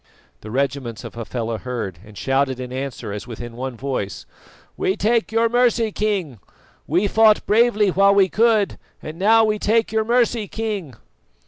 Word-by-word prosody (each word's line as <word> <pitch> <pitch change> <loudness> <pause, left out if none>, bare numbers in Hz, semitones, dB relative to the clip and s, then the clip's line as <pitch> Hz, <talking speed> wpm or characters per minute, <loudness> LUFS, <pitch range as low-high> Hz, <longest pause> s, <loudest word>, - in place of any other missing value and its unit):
The 110 - -10
regiments 130 -2 -2
of - - -8
Hafela 115 -1 -4
heard, 115 -9 -5
and 105 -1 -15
shouted 135 -1 0
in 125 0 -6
answer 135 -5 -5
as 105 +3 -7
with 115 -3 -8
one 120 +1 -6
voice: 125 -7 -4 0.5
"We 190 - -1
take 225 +1 +1
your 225 +1 +3
mercy, 235 -1 +2
King! 195 - -2 0.5
We 175 +7 +1
fought 220 +1 +4
bravely 215 -2 +3
while 195 +2 +4
we 195 -1 +5
could, 220 0 +2 0.2
and 155 +2 -8
now 225 +3 +5
we 215 -1 +1
take 225 +1 +1
your 220 0 +1
mercy, 235 -2 +1
King!" 205 - -4
190 Hz, 160 wpm, -21 LUFS, -, 0.5 s, we